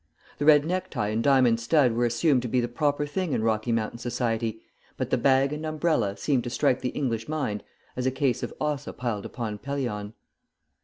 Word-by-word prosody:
The 145 - 0
red 150 -1 +6
necktie 175 - -2
and 110 +2 0
diamond 130 -4 +4
stud 130 +1 +3
were 120 +1 +1
assumed 125 +3 +2
to 125 - -3
be 125 +2 +1
the 120 - 0
proper 145 +4 0
thing 160 +2 -2
in 110 - 0
Rocky 110 +1 0
Mountain 115 0 -1
society, 115 -2 -2 0.4
but - - -3
the - - +3
bag 135 +1 +3
and 150 +1 -5
umbrella 155 -10 0
seemed 130 +3 +1
to - - -2
strike 125 +1 +1
the 125 - -1
English 115 -4 -2
mind 140 -10 -2 0.3
as 125 0 -1
a - - +2
case 130 -2 0
of - - -4
Ossa 150 -2 -2
piled 115 -5 -3
upon 110 -4 -5
Pelion. 120 -7 -3
125 Hz, 200 wpm, -26 LUFS, 115-145 Hz, 0.4 s, red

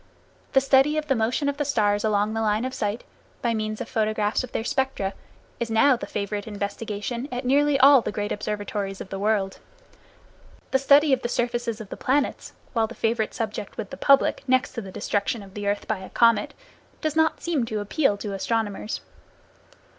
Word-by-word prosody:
The 270 - +6
study 275 +3 +4
of 305 - -1
the 285 - +2
motion 235 +5 0
of 285 0 -1
the 295 - 0
stars 210 -7 +1
along 210 0 +1
the 225 - -1
line 215 +2 +1
of 260 - -4
sight, 210 0 -2 0.4
by 235 -1 +2
means 215 -1 -2
of 245 - -4
photographs 215 -2 0
of 255 - -8
their - - -2
spectra, 255 -6 -1 0.5
is 235 -1 -2
now 225 +5 +5
the 240 - -6
favorite 205 0 -3
investigation 210 +4 -4
at 250 +1 -4
nearly 285 +2 +3
all 275 -1 +8
the - - -3
great 205 0 -3
observatories 205 -1 -3
of - - -8
the 195 - -5
world. 200 -2 0 1.1
The 265 - +3
study 280 +1 +5
of 260 - +2
the 240 - -2
surfaces 240 -2 -1
of 215 -3 -9
the - - -7
planets, 275 +2 0 0.2
while 225 -3 +2
the 240 - -10
favorite 225 -1 -1
subject 215 -3 -4
with - - -5
the - - -5
public, 275 0 +4
next 255 0 +2
to 235 - -4
the 195 -3 -9
destruction 205 +3 -2
of 195 -1 -14
the 205 0 -4
earth 205 0 -1
by 220 -3 -1
a 190 - -9
comet, 230 -3 +3 0.5
does 310 -1 -1
not 320 0 +2
seem 325 -7 0
to 215 -2 -2
appeal 205 +2 +1
to 200 0 -5
astronomers. 210 +1 -2
225 Hz, 200 wpm, -25 LUFS, 205-260 Hz, 1.1 s, all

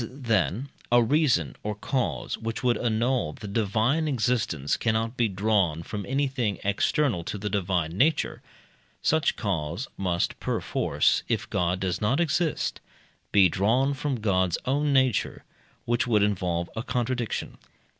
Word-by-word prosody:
As, 115 - -4
then, 120 -1 0 0.2
a 120 0 +6
reason 120 - +2
or 105 0 -3
cause 130 +4 -2
which 115 +1 -5
would 120 -1 +3
annul 115 -6 0
the 105 - -9
divine 115 +9 +1
existence 115 - 0
cannot 115 +1 0
be 120 -2 +2
drawn 95 -5 +1
from 105 +3 -5
anything 130 -6 0
external 100 - +1
to - - -4
the 105 +1 -4
divine 90 -5 0
nature, 155 +2 +2 0.6
such 160 -1 +2
cause 90 - -2
must 90 -3 -1
perforce, - - +1
if - - -1
God 90 +1 0
does 95 -2 -2
not 110 +8 +2
exist, 165 -1 0 0.5
be 100 -2 +6
drawn 115 - +2
from 135 -3 -3
God's 95 -4 +1
own 145 +3 +1
nature, 130 -5 +1 0.4
which 120 +1 +1
would 105 -4 +3
involve 90 -4 0
a 110 - -2
contradiction. 120 -1 -2
110 Hz, 140 wpm, -26 LUFS, 95-130 Hz, 0.6 s, a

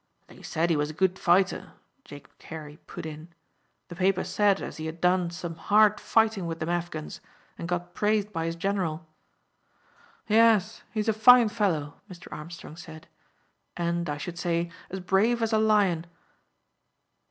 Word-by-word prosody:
"They - - -16
said 170 +2 -1
he - - +3
was 150 0 0
a - - -6
good 190 0 +1
fighter," 185 +2 +2 0.3
Jacob 145 -1 -13
Carey 150 -2 -9
put - - -8
in. 155 +1 -8 0.6
"The 175 - -9
papers 185 +1 +1
said 205 -2 +3
as - - -7
he 160 0 -5
had 160 +1 -7
done 180 0 +2
some 170 0 -6
hard 210 +5 +3
fighting 220 -5 +1
with 165 0 -5
them 160 - -3
Afghans, 175 -3 -4 0.3
and 170 - -6
got 175 0 -3
praised 210 0 0
by 165 -1 -2
his 165 - -3
general." 175 -3 -2 1.2
"Yes, 220 -1 +4
he's 215 0 -2
a 220 - +3
fine 240 +1 +7
fellow," 170 -9 -1
Mr. 180 -2 -11
Armstrong 160 0 -10
said, 160 -2 -11 0.7
"and, 170 -1 -1
I 145 - -2
should 175 +3 -6
say, 170 -1 -1 0.2
as 190 0 -5
brave 200 +6 +2
as 225 0 0
a 220 - +4
lion." 200 -6 +2
175 Hz, 165 wpm, -27 LUFS, 165-205 Hz, 1.2 s, fine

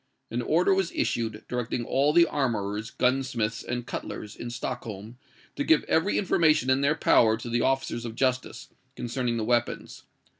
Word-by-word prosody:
An 120 +2 -1
order 170 +9 +3
was 190 -2 0
issued, 110 -2 -2
directing 125 -1 -3
all 140 +5 +2
the 170 +2 +6
armourers, 110 -7 -2
gunsmiths, 125 -4 0
and 120 0 -4
cutlers, 105 -3 -6
in 120 - -6
Stockholm, 115 -2 -6 0.4
to 285 - -1
give 320 +2 +4
every 165 +6 +1
information 155 -8 +3
in 130 +1 +2
their 140 +2 +2
power 110 -7 +4
to 120 +1 -7
the 120 0 +1
officers 135 -3 0
of 115 -2 -6
justice, 130 -1 -1 0.3
concerning 120 0 -2
the 110 - -2
weapons. 120 0 -1
125 Hz, 160 wpm, -27 LUFS, 115-140 Hz, 0.4 s, the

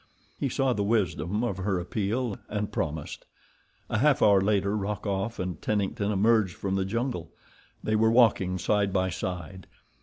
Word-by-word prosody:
He 140 - 0
saw 135 0 +1
the 105 - -2
wisdom 100 -2 0
of 115 -6 -1
her 95 -1 -1
appeal, 105 +5 -2
and 105 -1 -2
promised. 80 -1 -4 0.6
A 110 - -1
half 145 +1 +4
hour 100 -2 +6
later 100 0 +1
Rokoff 105 +1 -2
and 90 -1 -4
Tennington 105 0 -1
emerged 105 -2 +3
from 95 -1 -3
the 95 -1 0
jungle. 115 -4 -2 0.5
They 110 - +1
were 110 +1 +4
walking 110 -6 +4
side 100 +1 +1
by 95 0 +1
side. 90 +1 -5
100 Hz, 155 wpm, -27 LUFS, 95-110 Hz, 0.6 s, hour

